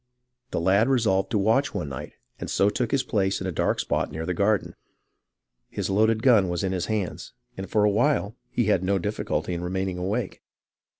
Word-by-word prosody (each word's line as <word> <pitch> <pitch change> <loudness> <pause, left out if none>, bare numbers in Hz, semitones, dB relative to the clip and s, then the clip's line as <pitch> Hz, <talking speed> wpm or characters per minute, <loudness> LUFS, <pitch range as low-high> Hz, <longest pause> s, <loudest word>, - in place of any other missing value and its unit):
The - - -2
lad 100 +7 +3
resolved 105 -7 +2
to 110 - 0
watch 115 +8 +2
one 75 - -3
night, 70 - -7 0.3
and - - -5
so 100 +1 +2
took 120 0 -1
his 135 +1 +1
place 95 -6 0
in 95 - -5
a 95 - -1
dark - - 0
spot - - -1
near 80 +1 -4
the 90 - -1
garden. 100 +3 +1 1.0
His - - -3
loaded 110 +3 +2
gun 110 -8 +5
was 85 0 -2
in 95 - 0
his 90 -2 -2
hands, 105 - -3 0.2
and 95 0 -7
for 105 - +2
a 105 - +4
while 115 -1 +1
he 120 - 0
had 100 -4 +2
no 100 +1 +1
difficulty 95 -1 -2
in 85 - -3
remaining 95 0 -2
awake. 100 +4 -3
100 Hz, 200 wpm, -25 LUFS, 95-110 Hz, 1.0 s, gun